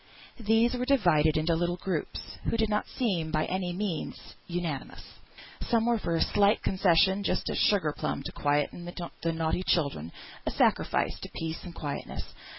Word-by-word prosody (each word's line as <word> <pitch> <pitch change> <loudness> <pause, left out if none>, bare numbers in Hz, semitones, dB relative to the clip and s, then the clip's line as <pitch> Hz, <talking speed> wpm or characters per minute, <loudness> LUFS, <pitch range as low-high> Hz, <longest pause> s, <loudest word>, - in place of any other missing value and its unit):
These 225 +2 +3
were 250 0 -1
divided 175 - +4
into 155 +2 +2
little 175 +2 0
groups, 180 -4 -4
who 230 - +1
did 220 -1 +1
not 210 0 0
seem 190 -10 -1
unanimous - - -6
by 155 0 +2
any 185 -1 -2
means. 180 -2 -3 1.5
Some 230 -2 +3
were 235 -1 +2
for 170 -4 -1
a - - +1
slight 205 +1 +3
concession, 190 +1 +3
just - - 0
a - - -2
sugar 180 -8 +3
plum - - -2
to - - -5
quieten 145 +4 0
the 170 -1 -4
naughty 165 +2 0
child, 165 -6 +2
a 80 +2 -8
sacrifice - - +1
to - - -7
peace 160 0 -4
and 175 -2 -9
quietness. 145 -3 -5
175 Hz, 165 wpm, -29 LUFS, 160-210 Hz, 1.5 s, divided